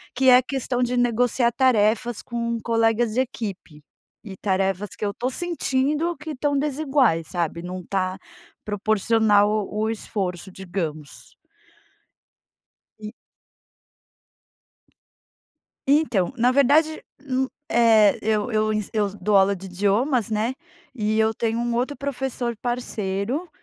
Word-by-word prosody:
que 260 Hz, +1 st, +4 dB
é 250 Hz, -, +9 dB
a 255 Hz, -, +4 dB
questão 255 Hz, -1 st, -2 dB
de 250 Hz, 0 st, 0 dB
negociar 245 Hz, 0 st, +2 dB
tarefas 235 Hz, -2 st, +2 dB
com 235 Hz, -1 st, -3 dB
colegas 225 Hz, 0 st, +1 dB
de 245 Hz, -, 0 dB
equipe 195 Hz, -, -5 dB, 0.4 s
e 195 Hz, -3 st, -9 dB
tarefas 195 Hz, 0 st, -1 dB
que -, -, -3 dB
eu 200 Hz, -, 0 dB
estou 245 Hz, +5 st, -3 dB
sentindo 305 Hz, +1 st, -1 dB
que 305 Hz, +2 st, -7 dB
estão 285 Hz, 0 st, -1 dB
desiguais, 270 Hz, -, +1 dB
sabe? 170 Hz, -2 st, -2 dB
Não 180 Hz, +1 st, -6 dB
está 185 Hz, +1 st, -2 dB, 0.5 s
proporcional 210 Hz, 0 st, +2 dB, 0.2 s
o 215 Hz, +1 st, -1 dB
esforço 190 Hz, -4 st, -4 dB
digamos. 170 Hz, -6 st, -6 dB, 1.6 s
E 215 Hz, 0 st, -8 dB, 2.7 s
Então, 270 Hz, -, +2 dB
na 245 Hz, +1 st, +3 dB
verdade, 295 Hz, +4 st, +3 dB, 0.2 s
hum, 260 Hz, 0 st, 0 dB, 0.2 s
eh, 220 Hz, -3 st, +5 dB
eu 215 Hz, +1 st, 0 dB
eu 215 Hz, 0 st, +1 dB
ensi 215 Hz, -2 st, -2 dB
eu 210 Hz, -2 st, +1 dB
dou 205 Hz, +2 st, +2 dB
aula 195 Hz, +1 st, +4 dB
de 190 Hz, +1 st, -9 dB
idiomas, 205 Hz, +6 st, 0 dB
né, 220 Hz, +4 st, 0 dB, 0.4 s
e 215 Hz, -2 st, -1 dB
eu 220 Hz, 0 st, +2 dB
tenho 230 Hz, +1 st, -1 dB
um 240 Hz, 0 st, -1 dB
outro 255 Hz, +5 st, -1 dB
professor 265 Hz, -3 st, -3 dB
parceiro, 240 Hz, -, -2 dB
225 Hz, 125 wpm, -23 LUFS, 200-255 Hz, 2.7 s, é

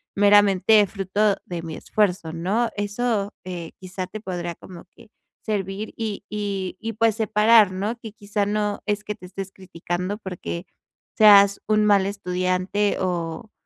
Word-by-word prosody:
meramente 205 Hz, 0 st, +5 dB
fruto 200 Hz, +1 st, 0 dB
de 175 Hz, -2 st, -5 dB
mi 160 Hz, -1 st, -6 dB
esfuerzo, 180 Hz, -5 st, -1 dB
¿no? 200 Hz, +8 st, 0 dB
Eso, 205 Hz, 0 st, -1 dB
eh, 175 Hz, -3 st, -6 dB
quizá 185 Hz, 0 st, -5 dB
te 215 Hz, +4 st, -7 dB
podría 175 Hz, -4 st, -4 dB
como 175 Hz, -2 st, -12 dB
que 230 Hz, -, -18 dB, 0.4 s
servir, 205 Hz, 0 st, -3 dB
y 215 Hz, -3 st, -4 dB
y 200 Hz, -3 st, -3 dB
y 225 Hz, 0 st, -4 dB
pues, 225 Hz, 0 st, +2 dB
separar, 220 Hz, -1 st, +5 dB
¿no?, 205 Hz, +5 st, -3 dB
que, 220 Hz, -2 st, -9 dB
quizá, 205 Hz, -1 st, -2 dB
no 210 Hz, 0 st, -1 dB
es 210 Hz, 0 st, -1 dB
que 210 Hz, -, -4 dB
te 185 Hz, -, -13 dB
estés 195 Hz, +1 st, -7 dB
criticando, 180 Hz, +1 st, -4 dB
porque 180 Hz, -3 st, -6 dB, 0.5 s
seas 200 Hz, -2 st, +7 dB
un 215 Hz, 0 st, +3 dB
mal 200 Hz, -2 st, +4 dB
estudiante, 185 Hz, +1 st, -1 dB
o 175 Hz, +2 st, -3 dB
200 Hz, 150 wpm, -23 LUFS, 185-210 Hz, 0.5 s, seas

